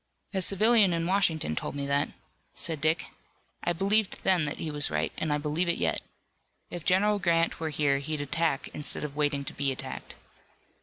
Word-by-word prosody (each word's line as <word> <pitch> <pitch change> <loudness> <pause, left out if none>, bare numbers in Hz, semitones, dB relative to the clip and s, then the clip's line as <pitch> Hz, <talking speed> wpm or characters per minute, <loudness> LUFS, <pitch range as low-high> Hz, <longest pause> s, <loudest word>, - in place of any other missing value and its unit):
"A 190 - 0
civilian 205 0 +4
in 165 0 -1
Washington 170 - +1
told - - -4
me 140 0 -2
that," 140 +1 +1 0.5
said 160 -4 -2
Dick. 160 +2 +1 0.5
"I 175 - +1
believed 195 +4 +1
then 185 -5 +4
that 150 - -3
he 160 - -4
was 145 0 +4
right, 75 +1 -1
and 155 - -2
I 150 - +2
believe 150 +4 -1
it 170 - +2
yet. - - +1 0.7
If 175 -2 -6
General 205 +3 +3
Grant 170 -2 +1
were 160 -1 -2
here 145 -2 +1
he'd 150 +2 -3
attack 145 0 0
instead 150 - -1
of 145 -2 -5
waiting 145 -2 0
to - - -6
be 140 -1 0
attacked." 130 - -6
160 Hz, 190 wpm, -28 LUFS, 145-180 Hz, 0.7 s, civilian